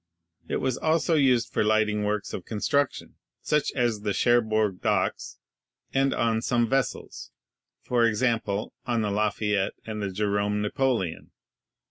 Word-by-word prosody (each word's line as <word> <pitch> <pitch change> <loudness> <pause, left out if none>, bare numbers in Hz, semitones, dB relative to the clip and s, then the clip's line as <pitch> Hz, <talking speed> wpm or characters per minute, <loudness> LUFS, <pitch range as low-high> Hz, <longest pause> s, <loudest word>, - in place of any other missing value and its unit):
It - - -2
was 130 -2 -1
also 160 +1 +1
used 130 -6 +3
for - - +2
lighting 105 -1 +2
works 105 -1 -2
of 90 - -5
construction, 130 +7 -1 0.3
such 150 -1 +1
as 120 -5 0
the 105 -1 -1
Cherbourg 110 -4 +2
Docks, - - -1 0.6
and 135 0 +2
on 115 -1 +1
some 120 -1 +1
vessels, 135 +2 -2 0.5
for 120 -2 +2
example, 110 -2 -1
on 120 -3 0
the 105 - -1
Lafayette 105 -1 0
and 110 -1 -5
the 100 - -2
Jerome 100 +1 0
Napoleon. 105 -5 -1
110 Hz, 135 wpm, -26 LUFS, 105-125 Hz, 0.6 s, used